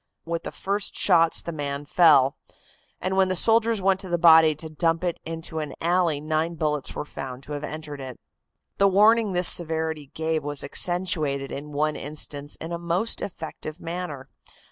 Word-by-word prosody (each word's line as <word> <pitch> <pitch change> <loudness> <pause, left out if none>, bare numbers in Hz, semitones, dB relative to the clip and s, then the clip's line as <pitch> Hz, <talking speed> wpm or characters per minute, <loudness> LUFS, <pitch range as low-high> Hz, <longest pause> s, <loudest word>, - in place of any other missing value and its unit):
With 170 0 -4
the - - -4
first 200 +1 -3
shots 165 0 +3
the 170 - -5
man 145 -2 -4
fell, 145 -5 +5 0.6
and 185 +1 -2
when 190 0 +3
the 185 - -1
soldiers 225 0 +3
went 190 0 +2
to 190 - -9
the 175 - +1
body 160 -2 +6
to 160 +2 -8
dump 165 +2 -1
it 175 -2 -2
into 165 0 -6
an 150 -2 -5
alley 170 -3 +1
nine 155 +2 -1
bullets 150 -3 -2
were - - -4
found 135 -2 -8
to 150 - -11
have 145 0 -4
entered 150 -2 -7
it." 130 -2 -8 0.6
The 200 - +5
warning 210 +2 +4
this 180 -1 +4
severity 160 -3 +1
gave 160 -1 -1
was 145 -1 -4
accentuated 155 -6 +1
in 150 +2 -7
one 150 +1 0
instance 145 -1 -3
in 165 - -8
a 170 - -3
most 175 +6 -2
effective 160 -3 -7
manner. 165 -6 -6
160 Hz, 180 wpm, -24 LUFS, 150-180 Hz, 0.6 s, body